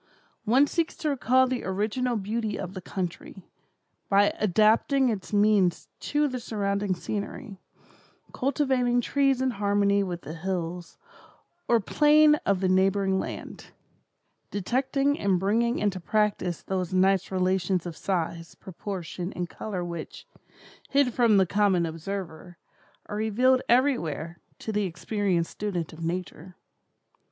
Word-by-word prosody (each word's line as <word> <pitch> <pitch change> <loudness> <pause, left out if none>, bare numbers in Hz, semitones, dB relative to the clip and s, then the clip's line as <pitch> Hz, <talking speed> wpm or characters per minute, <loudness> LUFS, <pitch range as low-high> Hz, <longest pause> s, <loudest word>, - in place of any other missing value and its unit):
One 255 +6 +5
seeks 335 +3 -1
to 310 - -2
recall 260 -1 +3
the 255 -1 -3
original 215 +6 -1
beauty 215 +1 -2
of 185 0 -6
the 185 - -7
country, 185 +1 -6 0.7
by 200 +1 +4
adapting 220 +7 +3
its 205 -5 -4
means 205 -4 +2
to 295 0 0
the 255 -2 -4
surrounding 200 -3 -1
scenery; 205 +2 -6 0.7
cultivating 260 -3 +1
trees 275 0 +1
in 260 - +1
harmony 200 -1 +2
with 180 -3 -4
the 155 - -7
hills 175 0 -4 0.7
or 235 -1 +4
plain 300 +7 +5
of 195 -2 +2
the 190 - +2
neighboring 190 +1 +2
land; - - -7 0.8
detecting 270 +7 0
and 190 -3 +1
bringing 230 +5 +1
into 200 -3 -1
practice 200 -3 -1
those 185 -2 -2
nice 190 0 +3
relations 185 -1 0
of 170 -2 -6
size, 170 -3 -3
proportion 185 -1 -6
and 175 -1 -4
color 185 -3 -5
which, 170 -2 -7 0.6
hid 275 -3 +2
from 230 -4 +4
the 190 - +5
common 190 -2 +2
observer, 170 0 -6 0.5
are 205 - -5
revealed 250 +4 +2
everywhere 175 - +1 0.2
to 220 - -5
the 210 -1 0
experienced 180 -1 -1
student 180 -7 -4
of 160 +1 -9
nature. 180 +1 -5
200 Hz, 130 wpm, -26 LUFS, 180-235 Hz, 0.8 s, One